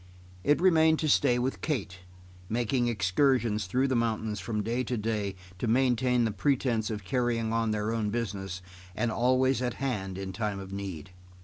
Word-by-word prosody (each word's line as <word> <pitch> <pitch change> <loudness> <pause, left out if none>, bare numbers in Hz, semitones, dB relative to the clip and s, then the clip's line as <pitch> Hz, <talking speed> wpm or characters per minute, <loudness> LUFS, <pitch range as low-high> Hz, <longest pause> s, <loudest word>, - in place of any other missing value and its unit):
It 145 +1 +3
remained 160 -3 +5
to 155 - 0
stay 125 -3 +4
with 125 +2 -2
Kate, 100 - -3 0.5
making 120 +2 +1
excursions 110 0 +1
through 130 +8 +1
the 130 - 0
mountains 110 -3 -1
from 105 +2 -2
day 120 +4 -1
to 125 0 -2
day 105 -3 -2 0.2
to 120 - -1
maintain 125 0 +2
the 110 - 0
pretence 115 0 0
of 105 -3 -4
carrying 115 0 0
on 115 -1 +1
their 105 0 -1
own 110 -2 -1
business, 95 -5 -4 0.3
and 115 +1 0
always 130 +2 +2
at 125 -2 -1
hand 100 -9 -3
in 95 -1 -5
time 105 -1 -2
of 95 0 -8
need. 95 -3 -6
115 Hz, 175 wpm, -29 LUFS, 105-125 Hz, 0.5 s, remained